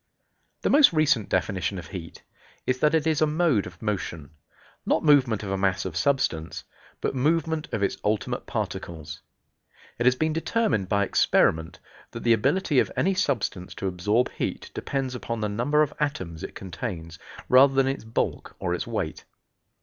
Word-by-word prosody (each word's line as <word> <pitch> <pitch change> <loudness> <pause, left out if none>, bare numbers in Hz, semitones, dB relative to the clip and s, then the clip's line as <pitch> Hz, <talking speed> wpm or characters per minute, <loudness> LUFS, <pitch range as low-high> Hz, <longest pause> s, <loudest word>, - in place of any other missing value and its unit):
The - - +2
most 285 -5 +7
recent 145 -9 +2
definition 95 +1 -1
of 85 -2 -8
heat 85 -4 -8 0.4
is 130 0 0
that 150 +3 +3
it 160 -1 +1
is 160 -2 +1
a 155 - +5
mode 150 - +2
of 90 -1 -12
motion; 85 -8 -3 0.5
not - - +1
movement 135 -8 +4
of 95 - -4
a 95 - 0
mass 95 -1 +1
of - - -5
substance, 130 - 0 0.4
but - - -1
movement 160 +3 0
of 105 - -1
its - - 0
ultimate 105 0 -1
particles. 80 -3 -5 0.8
It 120 - +2
has 125 - +5
been 155 +3 0
determined 165 - 0
by 100 -1 +2
experiment 80 -4 +2 0.4
that 115 - -6
the 115 - +5
ability 145 - +2
of - - +1
any 195 - +2
substance 130 - -1
to - - -5
absorb 105 +6 +1
heat - - -4
depends 135 -2 -3
upon 115 -2 -4
the 105 - 0
number 145 +9 +2
of 150 - -3
atoms 95 - -3
it - - -7
contains, 85 -4 -6 0.3
rather 135 +2 +6
than 135 0 +4
its 135 -3 -2
bulk 110 0 -3
or 85 - -2
its 90 - -3
weight. 105 -9 -3
115 Hz, 170 wpm, -26 LUFS, 95-150 Hz, 0.8 s, most